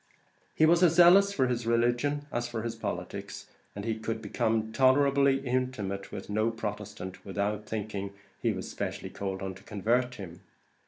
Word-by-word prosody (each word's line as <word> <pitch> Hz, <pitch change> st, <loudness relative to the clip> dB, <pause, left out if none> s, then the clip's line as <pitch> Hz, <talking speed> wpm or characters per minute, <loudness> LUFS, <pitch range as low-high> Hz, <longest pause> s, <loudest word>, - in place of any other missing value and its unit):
He 155 Hz, -, +5 dB
was 170 Hz, +2 st, +5 dB
as 170 Hz, -2 st, +5 dB
zealous 185 Hz, +3 st, +7 dB
for 135 Hz, -10 st, +2 dB
his 120 Hz, -2 st, -2 dB
religion 120 Hz, +5 st, +1 dB
as 120 Hz, 0 st, -1 dB
for 115 Hz, -2 st, -4 dB
his 115 Hz, -1 st, -2 dB
politics; 115 Hz, -, -5 dB, 0.3 s
and 100 Hz, +1 st, -5 dB
he 110 Hz, -1 st, -2 dB
could 110 Hz, 0 st, -3 dB
become 110 Hz, -1 st, -1 dB
tolerable 140 Hz, +3 st, +4 dB
intimate 125 Hz, -7 st, -1 dB
with -, -, -7 dB
no 110 Hz, +2 st, +1 dB
Protestant, 105 Hz, -4 st, -6 dB
without 105 Hz, +2 st, -2 dB
thinking 105 Hz, -2 st, -4 dB, 0.3 s
he -, -, +2 dB
was -, -, -5 dB
specially -, -, -5 dB
called 95 Hz, -1 st, -4 dB
on 95 Hz, 0 st, -3 dB
to 95 Hz, -, -14 dB
convert 120 Hz, +5 st, 0 dB
him. 85 Hz, -5 st, -9 dB
115 Hz, 165 wpm, -29 LUFS, 105-130 Hz, 0.3 s, zealous